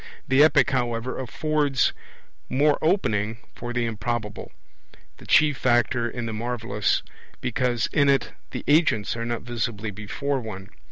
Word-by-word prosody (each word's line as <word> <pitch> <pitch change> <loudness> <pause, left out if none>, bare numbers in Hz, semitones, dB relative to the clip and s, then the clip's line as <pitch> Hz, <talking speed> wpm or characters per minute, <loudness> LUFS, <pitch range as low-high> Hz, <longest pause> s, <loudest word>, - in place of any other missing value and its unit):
The 130 +2 +4
Epic, 155 -1 +4
however, 120 -1 -1
affords 145 0 +1 0.6
more 145 +3 +3
opening 110 - +1 0.2
for 120 0 -6
the 120 -1 0
improbable, 115 -2 -3 0.7
the - - -14
chief 150 -2 +4
factor 120 -1 +2
in 120 0 -5
the 110 - -4
marvellous, 115 -2 -1 0.4
because 125 -2 0
in 140 -1 +4
it 135 -2 +2 0.2
the - - -6
agents 145 - +3
are 115 0 -3
not 120 -1 -3
visibly 115 -3 -3
before 130 +7 -3
one. 100 -5 -8
120 Hz, 135 wpm, -25 LUFS, 110-135 Hz, 0.7 s, The